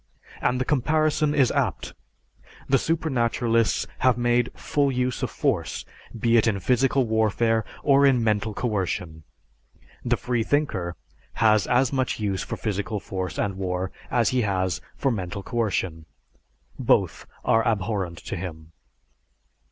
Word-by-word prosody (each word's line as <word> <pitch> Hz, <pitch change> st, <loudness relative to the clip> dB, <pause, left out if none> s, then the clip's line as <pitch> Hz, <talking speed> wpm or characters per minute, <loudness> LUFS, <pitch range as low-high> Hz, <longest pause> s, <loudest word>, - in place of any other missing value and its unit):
And 125 Hz, +1 st, +1 dB
the 130 Hz, -, 0 dB
comparison 150 Hz, +2 st, +1 dB
is 135 Hz, -5 st, +4 dB
apt, -, -, -1 dB, 0.7 s
the 135 Hz, 0 st, +4 dB
supernaturalists 120 Hz, -7 st, +1 dB
have 130 Hz, -2 st, +3 dB
made 120 Hz, 0 st, +2 dB
full 140 Hz, -2 st, 0 dB
use 125 Hz, 0 st, -1 dB
of -, -, -1 dB
force, -, -, -1 dB, 0.3 s
be 115 Hz, +1 st, +3 dB
it 115 Hz, -, +3 dB
in 100 Hz, -3 st, +1 dB
physical 130 Hz, +5 st, +2 dB
warfare 110 Hz, 0 st, +1 dB, 0.2 s
or 140 Hz, -1 st, +5 dB
in 125 Hz, -4 st, +3 dB
mental 110 Hz, -1 st, 0 dB
coercion. 90 Hz, -8 st, -2 dB, 0.8 s
The -, -, +1 dB
freethinker 115 Hz, -, -1 dB, 0.4 s
has 110 Hz, -3 st, +3 dB
as 125 Hz, +1 st, +2 dB
much 130 Hz, -3 st, 0 dB
use 100 Hz, -3 st, -1 dB
for -, -, -5 dB
physical 105 Hz, 0 st, -2 dB
force 95 Hz, -2 st, -5 dB
and 100 Hz, -2 st, -1 dB
war 95 Hz, 0 st, -2 dB, 0.2 s
as 120 Hz, -2 st, +2 dB
he 130 Hz, -1 st, +1 dB
has 95 Hz, -4 st, -1 dB, 0.2 s
for 135 Hz, -, +1 dB
mental 100 Hz, -2 st, -4 dB
coercion; 95 Hz, -9 st, -2 dB, 0.7 s
both -, -, +1 dB, 0.2 s
are 115 Hz, -, +4 dB
abhorrent 100 Hz, -5 st, -1 dB
to -, -, -4 dB
him. 80 Hz, -3 st, -7 dB
115 Hz, 135 wpm, -25 LUFS, 95-125 Hz, 0.8 s, or